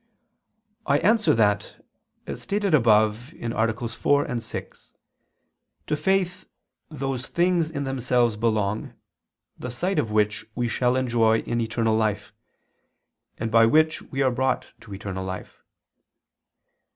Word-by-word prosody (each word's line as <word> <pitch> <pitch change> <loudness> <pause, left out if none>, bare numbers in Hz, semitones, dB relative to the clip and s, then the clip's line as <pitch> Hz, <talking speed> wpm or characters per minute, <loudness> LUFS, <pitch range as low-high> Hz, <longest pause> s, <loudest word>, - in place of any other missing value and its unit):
I 140 - +4
answer 215 - +3
that, 105 -2 0 0.4
As - - -6
stated 200 -3 -1
above 110 0 +3
(AA. 115 -1 0 0.2
4, 125 +1 0
6), 115 0 -8 0.9
to 150 - 0
faith 190 +2 0 0.4
those 135 -4 -4
things 175 -2 +1
in 140 -3 -4
themselves 125 -3 +1
belong, 110 -2 -1 0.6
the 125 - -5
sight 180 +11 -1
of 110 - -1
which 105 0 +1
we 120 -1 0
shall 125 +2 +1
enjoy 115 -3 +2
in 120 0 -2
eternal 115 0 0
life, 110 -2 -1 1.0
and 115 0 -3
by 115 0 +6
which 155 +5 +3
we 135 0 -2
are 130 - +3
brought 130 +1 -1
to 110 - -14
eternal 95 -2 -5
life. 95 0 -7
120 Hz, 125 wpm, -25 LUFS, 110-140 Hz, 1.0 s, by